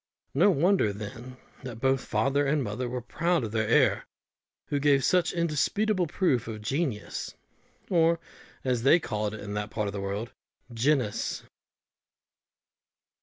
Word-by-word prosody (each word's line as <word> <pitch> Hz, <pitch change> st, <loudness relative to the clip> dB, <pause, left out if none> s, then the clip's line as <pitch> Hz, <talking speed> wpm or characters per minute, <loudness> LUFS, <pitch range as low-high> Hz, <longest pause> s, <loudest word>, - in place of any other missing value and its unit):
No -, -, +5 dB
wonder, 175 Hz, -, +3 dB
then, 115 Hz, +5 st, -8 dB, 0.2 s
that 125 Hz, -4 st, -7 dB
both 135 Hz, 0 st, +1 dB
father 135 Hz, +7 st, +1 dB
and 145 Hz, 0 st, +1 dB
mother 120 Hz, +3 st, -3 dB
were 125 Hz, -1 st, -4 dB
proud 170 Hz, +5 st, 0 dB
of 110 Hz, -, -4 dB
their 110 Hz, -1 st, 0 dB
heir, 115 Hz, -, +3 dB, 0.6 s
who 145 Hz, -, 0 dB
gave 140 Hz, -1 st, +3 dB
such 180 Hz, -1 st, +3 dB
indisputable 175 Hz, +4 st, +1 dB
proofs 145 Hz, -, +1 dB
of 110 Hz, -2 st, -6 dB
genius, 135 Hz, -3 st, -3 dB, 0.5 s
or, 165 Hz, -2 st, +3 dB, 0.4 s
as 125 Hz, -3 st, 0 dB
they 135 Hz, +8 st, +5 dB
called 105 Hz, -7 st, -3 dB
it 105 Hz, -, -9 dB
in 105 Hz, 0 st, -6 dB
that 105 Hz, 0 st, -3 dB
part 105 Hz, -1 st, -2 dB
of 100 Hz, -, -3 dB
the 100 Hz, -, -4 dB
world, 100 Hz, +4 st, -4 dB, 0.4 s
"genus." 125 Hz, -2 st, 0 dB
130 Hz, 145 wpm, -28 LUFS, 110-155 Hz, 0.6 s, No